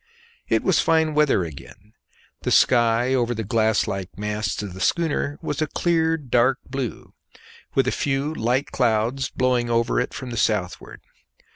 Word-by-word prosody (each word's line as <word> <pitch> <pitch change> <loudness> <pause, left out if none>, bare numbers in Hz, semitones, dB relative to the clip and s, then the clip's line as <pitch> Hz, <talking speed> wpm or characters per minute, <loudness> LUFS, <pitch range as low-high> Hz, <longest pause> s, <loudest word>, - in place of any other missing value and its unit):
It - - +1
was - - +3
fine 160 -1 +2
weather 150 -10 +3
again; 85 +6 -11 0.5
the - - -2
sky 120 +1 +3
over 120 -2 +1
the 110 - -3
glass 110 +1 +1
like 95 -1 -4
masts 105 -1 -3
of 100 -3 -6
the 95 - -9
schooner 145 - 0
was 150 +1 -3
a 155 - +1
clear 165 0 +1
dark 130 -2 +2
blue, 130 -3 -5 0.6
with - - +2
a - - +2
few 140 +2 -1
light 125 +1 -1
clouds 125 +2 0
blowing 125 -2 0
over 115 0 +1
it 125 - -2
from 130 -2 -7
the 120 - -5
southward. 105 -5 -2
120 Hz, 160 wpm, -23 LUFS, 110-140 Hz, 0.6 s, was